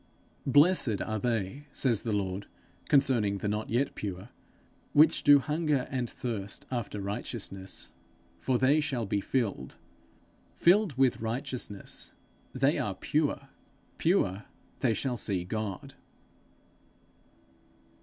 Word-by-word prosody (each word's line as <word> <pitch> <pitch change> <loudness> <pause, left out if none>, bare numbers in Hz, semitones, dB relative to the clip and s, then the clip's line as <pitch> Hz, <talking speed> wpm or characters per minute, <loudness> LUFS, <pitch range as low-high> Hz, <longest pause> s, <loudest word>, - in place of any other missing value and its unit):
'Blessed 145 - +4
are 110 -1 -2
they,' 115 +4 -2
says 120 -7 +1
the 115 - -3
Lord, 100 -1 -2 0.4
concerning 120 -8 +3
the 100 - -3
not 105 +1 -2
yet 125 +5 +1
pure, 100 +1 -5 0.6
'which 155 +2 +5
do 145 0 +8
hunger 150 -1 0
and 125 -3 -1
thirst 105 -5 -5
after 115 -4 -3
righteousness, 95 -1 -5 0.5
for 130 -2 +1
they 135 +5 +4
shall 135 -6 -1
be 100 0 0
filled.' 100 - -2 0.8
Filled 180 - +4
with 130 -4 +3
righteousness, 120 -2 -4 0.4
they - - +2
are - - -2
pure; - - -1 0.5
pure, 105 - +1 0.3
they 115 -4 +2
shall 125 -3 -2
see 95 -4 -1
God. 105 0 -4
120 Hz, 115 wpm, -29 LUFS, 100-140 Hz, 0.8 s, do